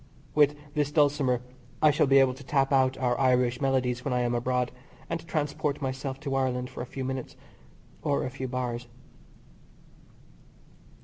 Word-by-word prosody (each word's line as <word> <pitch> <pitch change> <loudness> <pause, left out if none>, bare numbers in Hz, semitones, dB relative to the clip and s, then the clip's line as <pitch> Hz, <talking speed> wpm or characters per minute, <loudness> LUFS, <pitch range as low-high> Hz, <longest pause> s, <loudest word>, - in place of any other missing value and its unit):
With 145 -1 +4 0.2
this 145 -1 0
dulcimer 145 -5 +2 0.4
I 155 - +6
shall 150 0 +2
be 135 +1 +6
able 135 -1 +5
to 135 +2 -12
tap 135 0 +1
out 130 -1 +3
our 125 -2 +1
Irish 125 -1 +2
melodies 125 -3 +1
when 125 - -1
I 125 - +2
am 120 0 0
abroad, 125 +1 0 0.4
and 165 -1 -2
transport 150 -2 -1
myself 135 0 -3
to 140 -2 -3
Ireland 125 -1 0
for - - -6
a 120 - -5
few 135 -1 -4
minutes, 130 -1 -4 0.7
or 145 -2 0
a 130 - -4
few 130 0 -5
bars. 125 -1 -3
130 Hz, 165 wpm, -28 LUFS, 125-145 Hz, 0.7 s, I